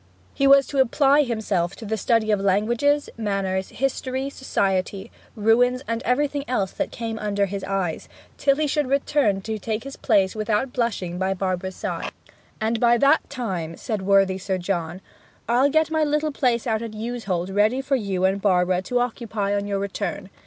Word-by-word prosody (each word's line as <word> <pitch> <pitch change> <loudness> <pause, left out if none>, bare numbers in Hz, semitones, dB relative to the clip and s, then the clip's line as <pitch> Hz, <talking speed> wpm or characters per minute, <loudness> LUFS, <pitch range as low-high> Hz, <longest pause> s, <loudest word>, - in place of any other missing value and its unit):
He 275 - +2
was 275 0 +7
to 280 - -3
apply 275 +3 +4
himself 215 -9 -1
to 225 - -9
the 220 +1 -1
study 220 +1 +1
of 205 - +2
languages, 235 +9 +2
manners, 195 -3 -1
history, 265 +1 -2
society, 195 -5 -1 0.2
ruins, 245 +4 +3
and 230 0 -2
everything 285 +3 0
else 200 -7 0
that - - -3
came 225 -1 -5
under 205 -1 0
his 195 0 -5
eyes, 190 -4 -2 0.3
till 275 -1 +2
he 305 +1 0
should 295 -1 0
return 270 -7 +1
to 220 +2 -4
take 220 +2 -3
his 275 0 -8
place 200 -5 +2
without 215 +4 -1
blushing 195 -8 -2
by 190 0 0
Barbara's 185 0 -2
side. - - -4 0.5
'And 225 +1 0
by 240 0 +4
that 280 +5 +3
time,' 185 - -4
said 215 -3 -3
worthy 195 -1 +3
Sir 190 0 -2
John, 175 -1 -3 0.5
'I'll 250 +4 +3
get 315 +2 +2
my 315 -1 +2
little 300 +1 0
place 245 -5 0
out 220 -2 0
at 225 -2 -6
Yewsholt 210 -6 -3
ready 215 +6 +3
for 270 +1 0
you 195 -6 -1
and 195 +1 +1
Barbara 180 -2 +2
to 245 +6 -2
occupy 220 -4 -2
on 205 0 -1
your 200 -1 -1
return. 195 -1 -4
220 Hz, 180 wpm, -23 LUFS, 195-255 Hz, 0.5 s, was